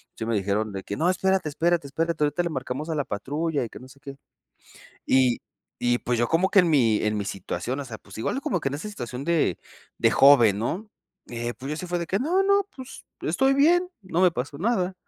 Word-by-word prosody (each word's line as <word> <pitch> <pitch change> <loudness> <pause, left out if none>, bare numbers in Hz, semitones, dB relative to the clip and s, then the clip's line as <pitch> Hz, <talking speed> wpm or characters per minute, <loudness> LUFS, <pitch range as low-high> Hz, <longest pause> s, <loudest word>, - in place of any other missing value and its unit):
Sí 110 - -5
me 115 - 0
dijeron 105 +2 -1
de 95 - -5
que 100 - -5
"no 175 +3 +2
espérate, 190 -3 +1
espérate, 165 0 0
espérate 165 +1 -1
ahorita 150 +4 +1
le 170 - -2
marcamos 135 +2 -4
a - - -1
la 145 - 0
patrulla 145 +7 -2
y 115 - -8
que - - -11
no 130 - -12
sé 140 +1 -17
qué" 140 -1 -10 0.9
y 130 -2 +3 0.4
y 120 0 +2
pues 120 -1 -1
yo 120 - +2
como 175 +6 +2
que 200 - +5
en 175 -2 +4
mi 115 -8 +3
en 105 0 0
mi 100 - -3
situación 110 +7 -4
o 140 - -5
sea 115 -3 -8
pues 100 - -15
igual 115 - -1
uno 275 - -3
como 180 - -1
que 135 - -3
en 140 - -4
esa 155 +9 -6
situación 125 - -6
de 165 - +1 0.4
de - - +3
joven, 120 -8 +6
¿no? 185 - -3 0.4
Eh, 120 0 -3
pues 135 +2 -8
yo 180 - -6
fue 175 0 -1
así 170 - -2
de - - -9
que 195 - 0
"no, 350 +8 +2
no 400 0 +3
pues 260 0 -10 0.2
estoy 270 0 +2
bien, 350 +5 +4
no 185 -2 -1
me 180 -2 +5
pasó 140 +1 -5
nada". 190 -3 0
145 Hz, 245 wpm, -25 LUFS, 120-180 Hz, 0.9 s, joven